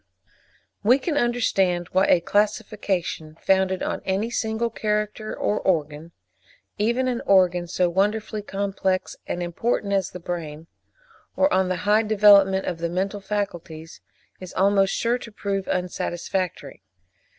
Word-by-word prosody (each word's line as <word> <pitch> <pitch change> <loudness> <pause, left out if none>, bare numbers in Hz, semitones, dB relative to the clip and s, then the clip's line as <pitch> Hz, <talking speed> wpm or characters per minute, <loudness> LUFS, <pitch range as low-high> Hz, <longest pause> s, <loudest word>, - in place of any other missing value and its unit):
We 240 +5 +5
can 295 +3 -3
understand 195 -9 +1
why 190 +1 +3
a 175 - +4
classification 195 -5 -1
founded 190 -1 +1
on - - -3
any 195 +5 -1
single 225 0 -1
character 210 0 -2
or 210 - 0
organ—even 170 - -3
an 245 -2 -1
organ 180 -2 +4
so 180 +1 +1
wonderfully 210 +4 0
complex 195 -2 -2
and 175 - -3
important 200 +3 -1
as 195 -2 +1
the 180 - -9
brain—or 175 - -5
on 190 -1 +2
the 185 - 0
high 210 +1 +4
development 200 -3 +5
of 175 -2 -3
the 170 0 -2
mental 195 +3 -2
faculties, 175 -5 -5 0.4
is 185 -1 -10
almost 195 0 +3
sure 235 +2 0
to 230 - -10
prove 200 -2 -3
unsatisfactory. 180 - -3
195 Hz, 130 wpm, -24 LUFS, 180-215 Hz, 0.4 s, We